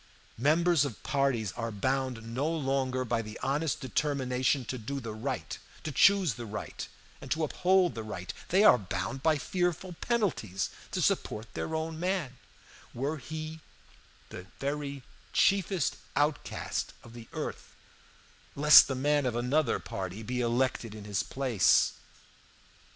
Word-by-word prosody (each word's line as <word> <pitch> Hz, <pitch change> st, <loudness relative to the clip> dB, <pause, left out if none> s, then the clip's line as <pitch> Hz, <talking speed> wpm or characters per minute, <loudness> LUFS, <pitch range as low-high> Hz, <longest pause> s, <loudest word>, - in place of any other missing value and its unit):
"Members 160 Hz, +3 st, +4 dB
of 130 Hz, -7 st, -5 dB
parties 135 Hz, -8 st, +1 dB
are 115 Hz, +2 st, -4 dB
bound 130 Hz, +2 st, -1 dB
no 140 Hz, +6 st, 0 dB
longer 135 Hz, -4 st, 0 dB
by 115 Hz, -1 st, 0 dB
the 110 Hz, -1 st, -8 dB
honest 145 Hz, +2 st, 0 dB
determination 130 Hz, 0 st, 0 dB
to 130 Hz, +2 st, -4 dB
do 140 Hz, +6 st, -4 dB
the 115 Hz, -4 st, -6 dB
right, 130 Hz, +5 st, -4 dB, 0.2 s
to 155 Hz, -, -3 dB
choose 190 Hz, +1 st, +5 dB
the 120 Hz, +1 st, -7 dB
right, 105 Hz, +1 st, -6 dB, 0.3 s
and 135 Hz, -, -9 dB
to 160 Hz, +3 st, 0 dB
uphold 180 Hz, +3 st, +3 dB
the 115 Hz, -, -5 dB
right 95 Hz, -4 st, -6 dB, 0.2 s
they 190 Hz, +4 st, +4 dB
are 125 Hz, -, +8 dB
bound 95 Hz, +7 st, -4 dB
by 155 Hz, +1 st, +3 dB
fearful 180 Hz, +3 st, -1 dB
penalties 175 Hz, -, -1 dB, 0.2 s
to -, -, -1 dB
support 110 Hz, +2 st, -1 dB
their 160 Hz, -, -3 dB
own 160 Hz, 0 st, -3 dB
man, 175 Hz, -8 st, -1 dB, 0.6 s
were 140 Hz, +6 st, -1 dB
he 155 Hz, +3 st, -6 dB, 0.7 s
the 90 Hz, +1 st, -9 dB
very 140 Hz, -1 st, -3 dB, 0.3 s
chiefest 190 Hz, -4 st, +2 dB, 0.2 s
outcast 145 Hz, +1 st, -1 dB
of 115 Hz, -, -13 dB
the 115 Hz, -1 st, -10 dB
earth, -, -, -6 dB, 0.8 s
lest 150 Hz, +1 st, +9 dB
the 135 Hz, -, -2 dB
man 145 Hz, +1 st, +2 dB
of 120 Hz, -, -1 dB
another 125 Hz, +3 st, +1 dB
party 95 Hz, +3 st, -5 dB
be 125 Hz, +2 st, -2 dB
elected 120 Hz, -2 st, 0 dB
in 105 Hz, -, -8 dB
his 105 Hz, -2 st, 0 dB
place. 130 Hz, -9 st, +3 dB
135 Hz, 145 wpm, -30 LUFS, 115-155 Hz, 0.8 s, lest